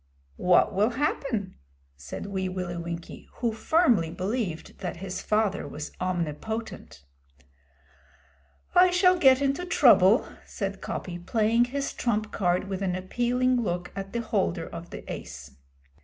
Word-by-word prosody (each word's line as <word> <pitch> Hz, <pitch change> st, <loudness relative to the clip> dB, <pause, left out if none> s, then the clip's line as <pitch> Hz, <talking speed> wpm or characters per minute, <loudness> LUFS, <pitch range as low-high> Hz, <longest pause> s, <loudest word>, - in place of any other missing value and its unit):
'What 180 Hz, +3 st, +3 dB
will 205 Hz, +4 st, +3 dB
happen?' 235 Hz, -6 st, -2 dB, 0.4 s
said 70 Hz, -, -7 dB
Wee 190 Hz, -2 st, -2 dB
Willie 180 Hz, -1 st, -4 dB
Winkie, 170 Hz, 0 st, -7 dB
who 235 Hz, -2 st, -1 dB
firmly 230 Hz, -, +3 dB
believed 185 Hz, -1 st, -4 dB
that 175 Hz, -2 st, -4 dB
his 185 Hz, +1 st, -5 dB
father 210 Hz, -6 st, 0 dB
was 150 Hz, +2 st, -7 dB
omnipotent. 180 Hz, -, -4 dB, 1.7 s
'I 360 Hz, +1 st, +7 dB
shall 365 Hz, 0 st, +4 dB
get 265 Hz, -2 st, +6 dB
into 275 Hz, +5 st, 0 dB
trouble,' 235 Hz, -, +5 dB, 0.2 s
said -, -, -5 dB
Coppy, 175 Hz, -1 st, -5 dB
playing 225 Hz, +5 st, +2 dB
his 275 Hz, +3 st, -3 dB
trump 215 Hz, -3 st, -1 dB
card 180 Hz, 0 st, 0 dB
with 190 Hz, -1 st, -4 dB
an 185 Hz, -2 st, 0 dB
appealing 245 Hz, +6 st, +1 dB
look 175 Hz, -4 st, -3 dB
at 195 Hz, 0 st, -5 dB
the 235 Hz, -, -2 dB
holder 85 Hz, -, -1 dB
of -, -, -8 dB
the -, -, -8 dB
ace. 70 Hz, +2 st, -8 dB
200 Hz, 135 wpm, -27 LUFS, 180-245 Hz, 1.7 s, I